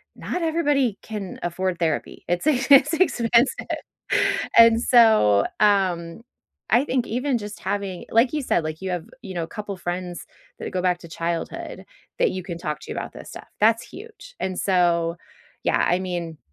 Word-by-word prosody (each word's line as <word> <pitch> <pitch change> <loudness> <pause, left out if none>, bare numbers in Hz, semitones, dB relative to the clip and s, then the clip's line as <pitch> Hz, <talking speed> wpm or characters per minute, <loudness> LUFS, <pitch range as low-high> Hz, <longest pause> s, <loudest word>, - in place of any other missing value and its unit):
not 360 - -4
everybody 290 -8 +1
can 210 -4 -7
afford 180 +1 -2
therapy. 160 -3 -2
It's 175 +6 -1
e 290 -5 +3
it's 280 +3 +7
expensive. 245 -7 +2 0.9
And 230 0 +8
so, 220 - +5
um, 185 -4 +1 0.5
I 240 - +4
think 255 -4 -1
even 255 +3 0
just 205 0 -8
having 195 -3 -3
like 230 +3 +4
you 305 - 0
said, 175 - +1
like, 155 +1 -5
you 190 -1 -3
have, 175 -2 -3 0.2
you 195 -4 -7
know, 165 -2 -2
couple 205 +1 -6
friends 175 0 -5 0.3
that - - -5
go 185 - -1
back 180 -1 +1
to 170 - -12
childhood 170 0 -4 0.3
that - - +3
you 185 0 -5
can 170 -2 -6
talk 150 -3 -4
to - - -9
about - - -5
this - - -11
stuff. - - -10
That's 225 +2 +4
huge. 460 +4 -12
And 185 -1 -3
so 170 -3 +2 0.5
yeah, - - +2
I 175 - +3
mean, 175 -3 -4
195 Hz, 170 wpm, -23 LUFS, 175-240 Hz, 0.9 s, And